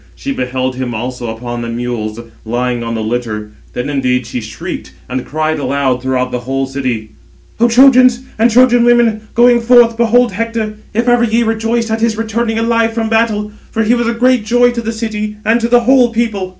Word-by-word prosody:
She 275 - -5
beheld 130 - -3
him 125 -2 -3
also 125 +2 -5
upon 120 +1 -5
the 115 - -5
mules, 115 -2 -4 0.2
lying 120 +1 -2
on 115 0 -4
the 110 - -3
litter; 110 -2 -4 0.2
then 125 - -3
indeed 130 -3 0
she 120 +1 -5
shrieked, 110 - -7
and 125 0 -3
cried 155 +1 -1
aloud 135 -3 -1
throughout 130 -1 -1
the 125 - -2
whole 135 +3 -2
city: 130 -5 -4 0.5
"O 235 - +4
Trojans 255 0 +5 0.2
and 230 +2 +4
Trojan 245 0 +4
women, 235 -3 +2
going 240 0 +5
forth, 235 -1 +4
behold 235 +1 +3
Hector, 225 +1 -3 0.2
if 235 +2 0
ever 240 -1 +3
ye 235 +1 +2
rejoiced 225 +1 -1
at 220 0 -1
his 225 -1 +1
returning 225 0 -2
alive 230 0 +1
from 225 -1 -1
battle; 220 -2 0 0.2
for 225 - -1
he 220 +3 +2
was 240 -1 0
a 235 - 0
great 250 -1 +2
joy 245 +3 +3
to 240 -1 -4
the 225 0 -3
city, 215 -2 -4
and 230 +2 +2
to 230 - +1
the 240 0 +4
whole 250 0 +4
people." 220 -5 -2
220 Hz, 200 wpm, -14 LUFS, -, 0.5 s, Trojans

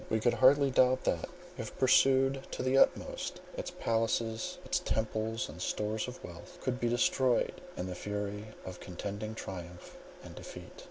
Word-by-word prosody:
We 110 - +2
could 120 +2 +3
hardly 140 +1 +5
doubt 130 0 +4
that, - - 0 0.3
if 115 - -6
pursued 135 +1 +4
to - - -3
the 130 +1 +2
utmost, - - +2 0.2
its - - -4
palaces, 115 0 -1
its - - +1
temples 110 0 -1
and 80 +4 -9
store 105 +3 -1
of 125 - -8
wealth 85 -1 -10
would 125 -1 0
be 120 - +1
destroyed 120 +1 +2 0.2
in 90 - -2
the 90 - -4
fury 105 +2 -4 0.2
of 95 -1 -7
contending 100 +4 -5
triumph 90 -4 -8 0.2
and - - -10
defeat. - - -10
110 Hz, 160 wpm, -32 LUFS, 105-130 Hz, 0.3 s, hardly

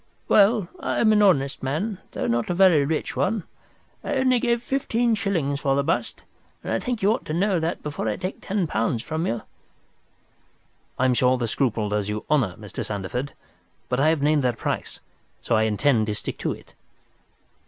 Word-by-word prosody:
"Well, 205 -2 +4
I - - -2
am 220 - +4
an 210 - +4
honest 140 -9 +3
man, 175 +10 -2
though - - -2
not 115 0 0
a 175 - 0
very 180 -6 +5
rich 155 +2 -2
one. 205 0 0 0.6
I - - -2
only 260 -2 +3
gave 235 -1 0
fifteen 245 -3 0
shillings 170 -10 -1
for 135 -2 +1
the 140 - +1
bust, 160 +4 -2 0.4
and - - -2
I - - +1
think 245 -6 -3
you 200 - +5
ought 245 - -4
to 155 - -3
know 190 0 +2
that 165 +2 -3
before 145 -7 -3
I 105 - -1
take 185 +1 -5
ten 195 -2 -1
pounds 115 -4 -1
from 160 +3 -2
you. 115 -1 -2 1.5
"I 130 - +2
am 130 - +4
sure 125 +1 +3
the 120 -2 -1
scruple 115 -3 0
does 105 -1 -1
you 105 0 -4
honour, 120 -12 +2
Mr. 105 -1 -6
Sandeford. 105 +7 -4 0.6
But 125 - 0
I 150 +3 +4
have 160 -3 +1
named 150 0 +3
that 125 -2 0
price, - - -4 0.4
so - - -2
I 110 0 +4
intend 110 +1 +2
to 105 - -1
stick - - -5
to - - -1
it." - - -10
150 Hz, 195 wpm, -24 LUFS, 120-200 Hz, 1.5 s, very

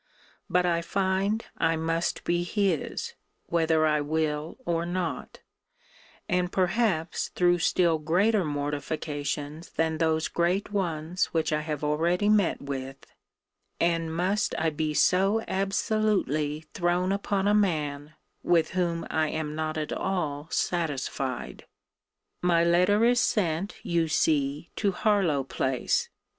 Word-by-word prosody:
But 180 0 +2
I 170 -1 +1
find 195 +4 0
I 165 - +2
must 165 +1 -1
be 175 0 +1
his, 185 -2 -1 0.3
whether 160 -2 +2
I 150 -1 +2
will 155 +1 -2
or 170 -1 0
not; 170 -5 -4 0.9
and 180 0 0
perhaps 185 -3 0
through 175 -1 +3
still 165 -1 +2
greater 190 +7 +2
mortifications 145 +1 -3
than 160 -1 -1
those 160 -1 +1
great 180 +4 0
ones 175 -3 -1
which 160 -1 +1
I 150 - +1
have 150 -1 -4
already 170 +7 +1
met 210 -8 +2
with 135 -1 -6 0.7
And 165 -1 +1
must 185 +6 0
I 160 0 +1
be 155 0 -2
so 195 +7 +3
absolutely 195 - 0
thrown 180 +1 +1
upon 200 0 0
a 205 - +4
man, 150 -7 0 0.3
with 170 -2 +2
whom 170 -2 -1
I 160 0 +1
am 155 -1 -3
not 155 0 -3
at 155 -1 -2
all 155 -6 -2
satisfied! 140 -6 -2 0.7
My 170 -1 +3
letter 180 +6 +4
is 245 0 +4
sent, 190 -3 0
you 170 -1 +1
see, 150 -1 0
to 200 -3 +1
Harlowe 180 -10 +2
place. 130 -1 -1
165 Hz, 125 wpm, -27 LUFS, 155-185 Hz, 0.9 s, a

